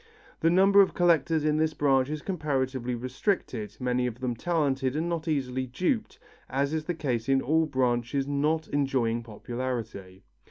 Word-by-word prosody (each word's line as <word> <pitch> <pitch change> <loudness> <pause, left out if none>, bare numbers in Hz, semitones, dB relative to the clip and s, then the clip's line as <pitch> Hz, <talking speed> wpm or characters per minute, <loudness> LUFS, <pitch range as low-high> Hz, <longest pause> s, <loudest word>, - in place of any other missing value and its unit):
The 165 - +3
number 195 +3 +6
of 195 - +1
collectors 165 -3 +2
in 150 0 +2
this 155 0 +1
branch 135 -2 +2
is 155 0 -4
comparatively 130 -8 -2
restricted, 125 - -2
many 125 -1 0
of 120 0 -6
them 125 -2 -2
talented 135 -3 0
and 160 +2 -1
not 170 -1 -3
easily 130 -4 -1
duped 185 - -1 0.3
as 140 +3 0
is 155 -1 -2
the 175 - -2
case 125 -6 -2
in 135 0 +4
all 160 +4 +2
branches 130 0 0
not 150 +3 0
enjoying 130 -5 0
popularity. 115 -4 -6
135 Hz, 160 wpm, -27 LUFS, 125-155 Hz, 0.3 s, number